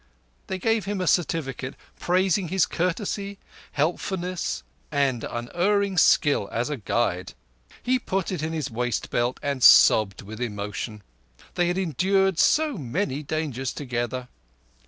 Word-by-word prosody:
They 190 - -3
gave 225 +1 +1
him 200 0 -2
a 185 - -1
certificate 140 -7 0 0.2
praising 185 +1 +1
his 190 +1 +2
courtesy, 195 +3 -2 0.4
helpfulness, 175 - -2 0.3
and 140 -5 +1
unerring 190 +11 0
skill 145 -12 +4
as 120 +6 -1
a 145 - -2
guide. 100 -5 -1 0.5
He 255 +1 +2
put 195 -5 -2
it 180 - -3
in 160 +1 -2
his 155 -6 -3
waist 125 +1 -2
belt 120 +1 0
and 140 -2 -2
sobbed 105 -4 +6
with 110 +4 -9
emotion; 105 -1 -4 0.5
they 175 -1 +1
had 175 +1 0
endured 190 +2 +1
so 300 - +3
many 145 - -2
dangers 145 -4 -3
together. 125 -2 -3
155 Hz, 135 wpm, -25 LUFS, 125-190 Hz, 0.5 s, sobbed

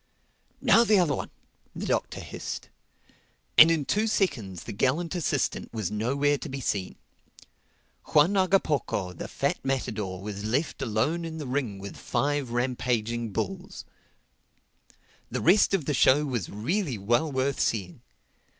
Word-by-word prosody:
"Now 230 - +6
the 215 -3 +4
other 170 -6 +3
one," - - -4 0.5
the - - -4
Doctor - - -1
hissed. - - -6 0.9
And 160 - +10
in 160 -4 +1
two 215 +8 +1
seconds 110 - -1
the - - -6
gallant 135 - 0
assistant 155 -6 -1
was 110 -5 -3
nowhere 140 +7 +1
to - - -6
be 135 +1 -5
seen. 100 -7 -2 1.1
Juan 155 +6 +4
Hagapoco, 160 - +1
the - - -6
fat - - -1
matador, 110 -8 -2
was 100 +1 -6
left 125 +9 -1
alone 135 +9 0
in 160 -1 -5
the 150 - -5
ring 125 -6 -2
with 100 0 -8
five 145 -2 -1
rampaging 120 -2 -1
bulls. 190 - -4 1.4
The - - -2
rest 210 - +5
of 165 -8 -2
the 150 - 0
show 140 +3 +4
was 120 -10 -3
really 140 - -2
well 120 +10 +1
worth 135 +1 0
seeing. 95 -6 -1
135 Hz, 140 wpm, -27 LUFS, 110-160 Hz, 1.4 s, And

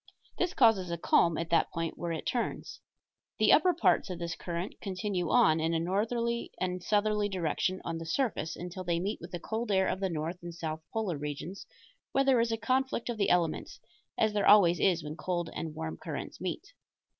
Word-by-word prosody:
This 360 0 0
causes 220 -7 +4
a 170 - -2
calm 170 0 +3
at 165 0 -4
that 165 - +3
point 165 -2 -3
where 170 -1 -4
it 160 - -4
turns. 245 - -3 0.6
The - - +5
upper 365 - +5
parts 335 - +2
of 180 - -4
this 170 -1 -4
current 175 +3 -5
continue 185 -2 -2
on, 160 0 +5
in 165 +1 0
a - - +2
northerly 230 +7 -1
and 180 0 -2
southerly 210 +1 +1
direction, 185 0 -1
on 165 -1 -3
the 165 - -6
surface 165 - -1
until 180 +2 -6
they 170 -1 0
meet 200 +5 -3
with 170 - -8
the 175 - -5
cold 220 +4 -3
air 190 -1 +3
of 185 - -1
the 195 -1 0
north 165 +2 -3
and 170 -1 -7
south 160 -1 -4
polar 200 -9 -2
regions, 150 +6 -6 0.5
where 275 - +4
there 265 -3 +4
is 230 0 +1
a 225 - 0
conflict 260 0 0
of 235 - -2
the 200 - +2
elements 170 -3 0 0.4
as 220 -1 +2
there 205 - +1
always 185 -4 +7
is 175 -5 +2
when 150 +1 -6
cold 175 -1 -2
and 160 -2 -5
warm 80 - -4
currents - - -6
meet. - - -5
180 Hz, 205 wpm, -30 LUFS, 165-215 Hz, 0.6 s, always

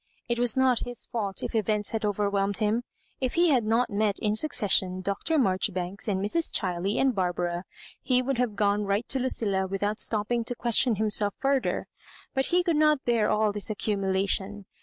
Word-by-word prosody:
It 235 0 -1
was 245 0 +3
not 260 -2 +3
his 245 -1 -5
fault 200 -5 -3
if - - -4
events 215 -1 0
had 225 -1 -3
overwhelmed 200 -1 0
him. 215 +2 +1 0.4
If 255 -2 -2
he 345 0 +4
had 255 -6 +3
not 230 +3 +1
met 205 0 0
in 210 -1 0
succes 220 -4 0
sion 185 0 +2
Dr. 200 - -1
Maijoribanks 190 -4 0
and 195 -3 0
Mrs. 215 - +1
Ohiley 185 +2 -2
and 265 -1 +3
Bar 185 -4 0
bara, 175 +1 -3 0.4
ho 255 0 +4
would 265 -1 -2
have 240 -4 0
gone 205 0 +1
right 200 +3 -1
to 265 - +1
Lucilla 205 -7 0
with 195 +1 -4
out 210 +1 -1
stopping 225 +2 0
to 245 - -2
question 235 0 +1
himself 205 -1 0
further, 270 -1 0 0.5
but 265 0 0
he 355 +1 +2
could 340 -4 +1
not 305 -2 +3
bear 230 -3 +2
all 215 0 +2
this 205 +1 -2
accumulation. 200 -1 -1
210 Hz, 195 wpm, -27 LUFS, 200-245 Hz, 0.5 s, he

